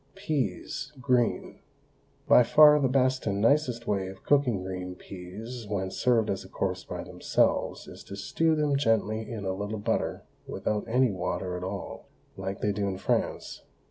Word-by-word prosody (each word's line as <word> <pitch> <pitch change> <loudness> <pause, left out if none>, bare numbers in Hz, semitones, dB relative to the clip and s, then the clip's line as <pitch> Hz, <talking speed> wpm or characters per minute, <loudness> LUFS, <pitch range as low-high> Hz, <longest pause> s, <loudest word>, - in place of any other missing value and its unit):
PEAS, 150 - -3
GREEN. 125 -3 0 0.7
By - - +8
far 150 +5 +7
the 135 - +2
best 130 -1 +1
and 100 -1 0
nicest 120 0 +2
way 100 -4 -1
of 95 0 -10
cooking 125 -9 +2
green 90 -1 -5
peas 105 +7 -8
when 95 -2 -2
served 115 -2 +2
as 95 - -3
a - - -13
course - - -2
by - - -6
themselves - - 0
is - - -11
to 100 - -8
stew 160 +10 +1
them 150 -2 +1
gently 110 -3 0
in 110 -4 -5
a 95 - -1
little 105 +3 -4
butter 100 - -1 0.2
without 105 -1 -2
any 125 +1 +3
water 90 0 -3
at 90 - -5
all, 95 +1 -6 0.3
like 95 +1 -5
they 105 - +1
do 100 0 -1
in 95 -1 -2
France. - - -2
110 Hz, 170 wpm, -28 LUFS, 95-130 Hz, 0.7 s, By